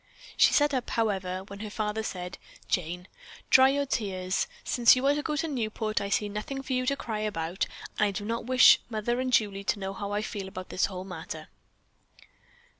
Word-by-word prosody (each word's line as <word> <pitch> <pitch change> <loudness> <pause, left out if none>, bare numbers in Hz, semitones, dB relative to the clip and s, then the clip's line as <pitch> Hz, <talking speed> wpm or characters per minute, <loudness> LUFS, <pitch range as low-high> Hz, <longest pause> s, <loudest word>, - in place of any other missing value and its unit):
She - - +6
sat 290 -1 +3
up, 255 -2 -1
however, 190 -5 -1
when 200 0 -10
her 215 0 -5
father 215 +1 -2
said, 180 -4 -5 0.3
"Jane, 180 +1 -2 0.4
dry 265 0 +8
your 280 +1 +1
tears. 190 -7 -1 0.2
Since 240 0 +5
you 255 +1 -1
are 280 - +5
to 295 - -1
go 300 0 -2
to 310 +3 -1
Newport, 220 -5 -2
I 200 - -3
see 210 +1 +1
nothing 215 +7 -5
for 265 - -3
you 255 0 0
to 280 - +2
cry 225 -5 -4
about, 185 -4 -2 0.3
and 210 - +4
I - - 0
do 200 +1 -4
not 230 +1 -3
wish 255 -1 +7
mother 240 +2 -1
and 255 0 -1
Julie 200 -4 +2
to - - +1
know 195 0 -4
how 200 +1 -5
I 205 +1 -1
feel 200 -3 -5
about 185 -1 -8
this 185 - +1
whole 185 -1 -6
matter." 160 -4 -7
210 Hz, 205 wpm, -28 LUFS, 190-255 Hz, 0.4 s, dry